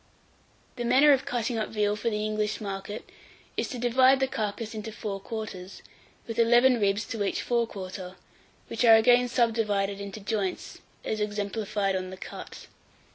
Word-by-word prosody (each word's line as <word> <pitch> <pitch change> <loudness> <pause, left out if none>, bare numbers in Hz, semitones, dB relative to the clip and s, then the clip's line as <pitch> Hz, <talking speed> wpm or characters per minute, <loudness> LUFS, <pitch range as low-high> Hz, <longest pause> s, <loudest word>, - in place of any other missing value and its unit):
854. 240 - -2
THE 235 - -1
MANNER 280 +4 +7
OF 265 - 0
CUTTING 240 -1 -1
UP 215 - -2
VEAL 210 -1 0
for 225 +2 -1
the 210 -1 -2
English 215 0 -1
market 200 0 -6 0.5
is - - -2
to 255 - -5
divide 255 +2 +4
the 265 - +2
carcase 215 -1 -3
into 220 0 -6
four 200 -2 -5
quarters, 195 -3 -7 0.4
with 230 -1 -5
eleven 240 +2 +5
ribs 200 +1 +1
to 220 -3 -3
each 195 - -1
fore 235 -1 +1
quarter; 185 -2 -7 0.5
which 230 - -2
are 225 -2 +9
again 245 +2 +5
subdivided 210 -5 0
into 200 +1 -7
joints 205 -2 -3 0.3
as 215 - -2
exemplified 205 -1 -1
on 185 0 -3
the 185 - -8
cut. - - -9
215 Hz, 170 wpm, -27 LUFS, 200-235 Hz, 0.5 s, are